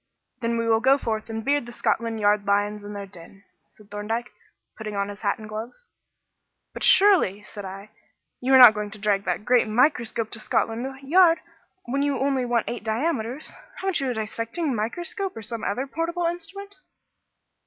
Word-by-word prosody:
"Then 235 -1 -1
we 230 0 -1
will 225 -1 +4
go 265 +3 +4
forth 220 -4 -3
and 225 0 -5
beard 285 -3 +1
the - - -8
Scotland 230 -1 -1
Yard 205 0 +3
lions 205 +1 0
in 205 0 -8
their 200 -1 -6
den," 195 +1 -14 0.3
said 210 -1 -21
Thorndyke, 220 +3 -3 0.4
putting 215 -2 -6
on 200 0 -1
his 205 0 -9
hat 200 -2 0
and 215 - -10
gloves. 225 - -7 0.9
"But - - -8
surely," 365 - +5
said 205 -1 -9
I, 195 +2 -9 0.5
"you 255 +2 -1
are - - +10
not 245 -4 +10
going 210 -1 -4
to 215 - -9
drag 200 -1 +1
that 180 +3 -2
great 245 -2 +3
microscope 230 -2 +1
to 225 - +1
Scotland 225 +2 -1 0.2
Yard, 335 +3 +5 0.5
when 270 +3 -1
you 285 -1 +1
only 270 -2 0
want 240 -2 0
eight 240 -3 -4
diameters. 245 +3 -2 0.2
Haven't 380 -4 -1
you 270 -2 -1
a 245 - -2
dissecting 230 +7 -3
microscope 340 - -3
or 225 - -7
some 230 +2 -5
other 250 +7 -1
portable 335 +5 -2
instrument?" 350 +4 -5
230 Hz, 185 wpm, -24 LUFS, 210-275 Hz, 0.9 s, are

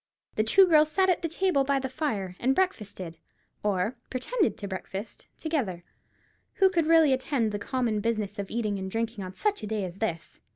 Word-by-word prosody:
The 215 - +1
two 375 - +6
girls 310 -3 +5
sat 375 +3 +3
at 355 - 0
the 335 - 0
table 330 -4 +2
by 280 0 +1
the 265 0 -1
fire, 225 - -3
and 265 +2 +2
breakfasted, 205 - -2 0.4
or 205 +4 0
pretended 370 - 0
to 200 - -5
breakfast, 195 +2 -6
together. 240 - -2 0.7
Who 385 -3 +4
could 335 -4 +1
really 325 -4 +6
attend 260 -4 0
to 205 - -3
the - - -7
common 240 -5 0
business 210 -2 -2
of 200 - -4
eating 215 -3 -1
and 190 0 -4
drinking 225 0 -2
on 185 0 -8
such 415 -1 0
a 215 - -5
day 215 -1 -1
as 180 0 -8
this? 170 -7 -4
230 Hz, 200 wpm, -28 LUFS, 200-310 Hz, 0.7 s, two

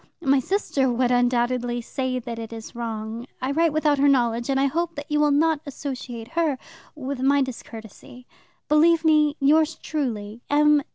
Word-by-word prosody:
My 275 -1 +4
sister 275 -4 0
would, 245 +1 +1
undoubtedly, 245 0 +1
say 260 +1 -3
that 235 -1 -6
it 225 0 -7
is 225 -1 -9
wrong. 230 0 -5
I 260 +2 -2
write 325 +2 +2
without 300 -2 +1
her 285 - +4
knowledge, 240 -2 +1
and 270 -1 +1
I 275 - +3
hope 335 +4 -1
that 290 +1 -8
you 300 - +2
will 300 0 +4
not 305 +1 +2
associate 250 -4 -6
her 325 -5 0 0.4
with 275 -2 -5
my 275 +1 +3
discourtesy. 240 -1 -10 0.4
Believe 320 +2 +4
me, 305 -1 +3
Yours 310 +3 +3
truly, 230 -7 -4
M. 295 0 +4
270 Hz, 170 wpm, -24 LUFS, 240-300 Hz, 0.4 s, My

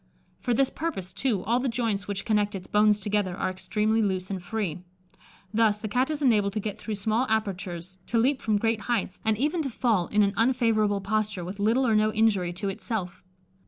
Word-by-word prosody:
For 245 -2 0
this 270 +2 +2
purpose, 190 - -4
too, 220 -7 0
all 235 +4 +1
the 260 +1 0
joints 225 -4 -1
which 200 -1 -3
connect 210 -1 +1
its 185 - -6
bones 210 0 +3
together 205 -2 -1
are - - -1
extremely 210 +4 0
loose 190 -2 -1
and 190 -2 -3
free. 180 -3 -3 0.7
Thus, 215 -1 +3
the 215 - -4
Cat 250 +6 +1
is 300 -1 -2
enabled 210 -6 +3
to 215 - -1
get 210 -1 -4
through 220 - -4
small 220 +5 0
apertures, 185 -4 -2
to 235 - 0
leap 260 +4 +2
from 215 -2 +1
great 225 +1 0
heights, 220 -3 -2
and 220 -1 +1
even 300 +7 0
to 280 - -2
fall 220 -7 +1
in 210 0 +3
an 200 -1 +1
unfavourable 225 -4 +2
posture 210 -2 -1
with 190 +3 -7
little 230 +6 +2
or 225 -3 +3
no 215 0 +3
injury 215 -5 +2
to 195 +3 -3
itself. 195 -2 -4
215 Hz, 205 wpm, -27 LUFS, 195-230 Hz, 0.7 s, bones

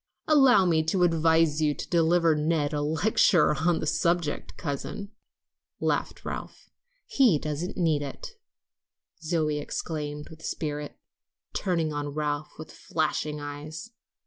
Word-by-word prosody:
"Allow 265 -10 +6
me 165 -3 +3
to 180 +3 +1
advise 165 -2 +3
you 150 -1 +2
to - - -6
deliver 165 -1 +3
Ned 150 -1 0
a 145 - 0
lecture 160 +2 +3
on 165 +3 +1
the - - -3
subject, 170 0 -1
cousin," 150 +7 -5 0.7
laughed - - -1
Ralph. - - -7 0.3
"He 245 - +4
doesn't 155 +4 -4
need 160 -5 +2
it," 140 - -7 0.9
Zoe 155 -2 0
exclaimed 150 0 -5
with 160 0 -13
spirit, 150 -1 -4 0.6
turning 165 -5 0
on 145 0 -3
Ralph 150 0 -2
with 155 0 -9
flashing 155 -1 -2
eyes. 145 +8 -7
155 Hz, 125 wpm, -27 LUFS, 150-170 Hz, 0.9 s, Allow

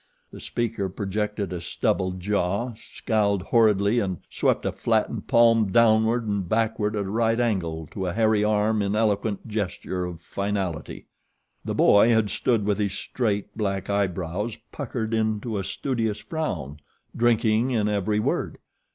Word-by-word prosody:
The - - -10
speaker 115 -5 -2
projected 100 0 -3
a 90 - -4
stubbled 95 +2 -1
jaw, 100 +4 -1
scowled 105 -3 -1
horridly 105 0 +3
and 95 -5 -2
swept - - +1
a - - +1
flattened - - -1
palm 115 -3 +4
downward 115 +1 +4
and 100 -4 -2
backward 110 -1 0
at 100 -1 -1
a - - -5
right 115 +1 +1
angle 85 -9 -1
to 95 -2 -3
a 90 - -2
hairy 110 -1 +2
arm 105 0 +2
in 100 +1 0
eloquent 105 0 0
gesture 95 -3 -3
of 90 -2 -7
finality. 95 -2 -4 0.6
The - - -3
boy 105 +3 +5
had 110 -3 +2
stood 115 -1 +1
with 105 0 0
his 100 -2 0
straight, 105 -2 -2
black 100 -2 -2
eyebrows 100 +2 -1
puckered 115 -5 -4
into 110 -1 -1
a - - -3
studious 115 -1 -2
frown, 80 - -4 0.4
drinking 115 0 +2
in 110 -5 +1
every 105 0 0
word. - - -1
105 Hz, 150 wpm, -25 LUFS, 100-115 Hz, 0.6 s, boy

